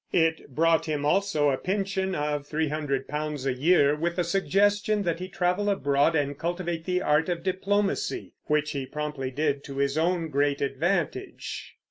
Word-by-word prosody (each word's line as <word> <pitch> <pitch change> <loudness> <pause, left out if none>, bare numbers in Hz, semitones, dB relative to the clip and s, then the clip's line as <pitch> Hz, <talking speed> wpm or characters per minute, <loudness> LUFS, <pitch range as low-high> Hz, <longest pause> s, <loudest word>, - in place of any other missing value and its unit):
It 160 -5 +1
brought 165 +1 +3
him 150 -2 -1
also 155 -3 +2
a 130 - 0
pension 190 -1 -1
of 150 -1 -2
three 155 0 -1
hundred 140 -3 -2
pounds 150 -2 -3
a 135 - +1
year, 145 +1 +4
with 170 +3 -2
a 180 - +2
suggestion 205 +3 +2
that 170 -2 -1
he 185 - -4
travel 185 +2 0
abroad 145 -4 +2
and 145 -2 -1
cultivate 170 -1 -3
the 180 0 0
art 150 +3 +2
of 170 -1 -2
diplomacy; 195 +2 -1
which 150 0 +1
he 135 -2 -4
promptly 150 -2 -4
did 140 +1 -1
to 135 -1 -7
his 140 +2 +1
own 170 0 +1
great 140 -1 +1
advantage. 160 +5 -2
160 Hz, 170 wpm, -27 LUFS, 145-180 Hz, -, year